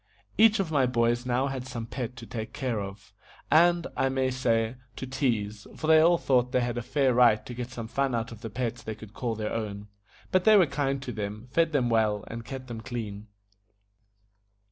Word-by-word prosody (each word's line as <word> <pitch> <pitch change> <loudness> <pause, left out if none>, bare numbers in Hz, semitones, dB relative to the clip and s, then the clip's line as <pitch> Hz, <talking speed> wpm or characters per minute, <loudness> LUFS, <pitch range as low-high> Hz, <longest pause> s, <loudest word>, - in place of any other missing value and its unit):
Each 220 -1 +5
of 180 -5 -1
my 135 -4 +3
boys 120 0 +1
had - - -6
now 130 +2 0
some 125 -2 -6
pet 125 0 -5
to 120 -3 -9
take 110 -1 -6
care 125 -6 -2
of, 100 0 -9 0.4
and, 170 +1 +5
I 135 - +1
may 130 -1 0
say, 115 -2 0 0.2
to - - -5
tease, 115 -6 -2
for - - -5
they 160 0 +7
all 170 +2 +5
thought 125 -5 +2
they 125 - +2
had 120 0 -1
a - - -3
fair 130 +1 +1
right 115 -3 +4
to 125 - -7
get 120 0 -5
some 120 -3 -6
fun 135 +1 0
out 115 0 -2
of 115 -2 -10
the 115 - -5
pets 120 +1 -3
they 110 - -5
could 110 -1 -12
call 115 -2 -2
their 110 -1 -3
own; 105 -2 -4 0.4
but 185 -1 +3
they 215 +1 +7
were 185 - +6
kind 135 -1 -1
to 125 - -4
them, 105 0 -5
fed 165 +2 +2
them 135 -5 +2
well, 110 -3 +2
and 115 0 -7
kept 130 +3 -7
them 115 -3 -7
clean. 110 -4 -6
125 Hz, 215 wpm, -28 LUFS, 110-135 Hz, 0.4 s, they